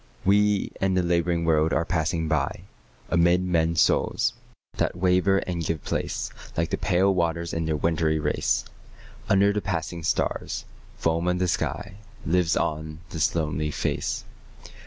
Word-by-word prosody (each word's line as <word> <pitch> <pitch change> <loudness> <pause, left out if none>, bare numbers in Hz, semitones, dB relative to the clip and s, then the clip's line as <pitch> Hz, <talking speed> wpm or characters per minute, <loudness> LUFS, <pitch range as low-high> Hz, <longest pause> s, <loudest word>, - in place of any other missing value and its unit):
We 105 +1 +3
and 95 -1 +2
the 90 - +2
labouring 85 -1 +1
world 80 -1 +3
are 85 - +1
passing 80 -1 0
by: 75 -3 -1 0.5
Amid 85 +2 +4
men's 85 -2 +2
souls, - - +2 0.4
that - - 0
waver 90 +2 +3
and 85 -2 -3
give 80 -3 -2
place - - -2 0.3
Like 80 0 0
the - - 0
pale 95 +2 +3
waters 85 -1 -1
in 80 0 -1
their 80 - +1
wintry 80 0 +1
race, 75 - 0 0.6
Under 100 0 +4
the 105 - -1
passing 85 -3 -3
stars, 80 -2 -1 0.3
foam 85 +1 0
of 90 0 +2
the 90 0 +1
sky, 95 +2 -2 0.3
Lives 85 -1 +2
on 75 +1 -2
this 80 0 0
lonely 75 -1 -1
face. - - -2
85 Hz, 150 wpm, -25 LUFS, 80-90 Hz, 0.6 s, Amid